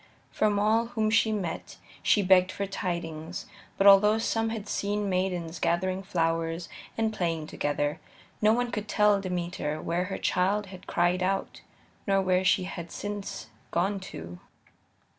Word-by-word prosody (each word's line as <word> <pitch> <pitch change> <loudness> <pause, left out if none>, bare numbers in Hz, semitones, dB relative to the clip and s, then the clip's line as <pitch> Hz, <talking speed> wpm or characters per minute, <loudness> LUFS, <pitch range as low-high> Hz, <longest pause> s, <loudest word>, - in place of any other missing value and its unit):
From 210 -1 +1
all 220 +3 +2
whom 220 -2 0
she 220 0 +4
met 195 -6 -4 0.2
she 205 - +3
begged 185 0 +5
for 200 - -3
tidings, 170 -4 -4 0.3
but 195 - +2
although 205 +2 +7
some 225 0 0
had 220 -2 -5
seen 205 0 -1
maidens 180 -3 -1
gathering 185 +3 0
flowers 165 -2 -1 0.3
and 220 -1 +1
playing 165 -5 -1
together, 145 -1 -1 0.4
no 215 0 +5
one 245 +1 +1
could 210 -2 -3
tell 210 -2 +3
Demeter 175 -4 -3
why 170 +2 -2
her 180 +2 -1
child 195 +3 +1
had 185 - -12
cried 175 +1 +1
out 195 +1 -1 0.5
nor 195 0 +3
where 185 -1 +2
she 185 - +3
had 175 -2 -6
since 205 -1 -5 0.2
gone 195 +4 0
to. 85 - -9
190 Hz, 150 wpm, -28 LUFS, 170-205 Hz, 0.5 s, although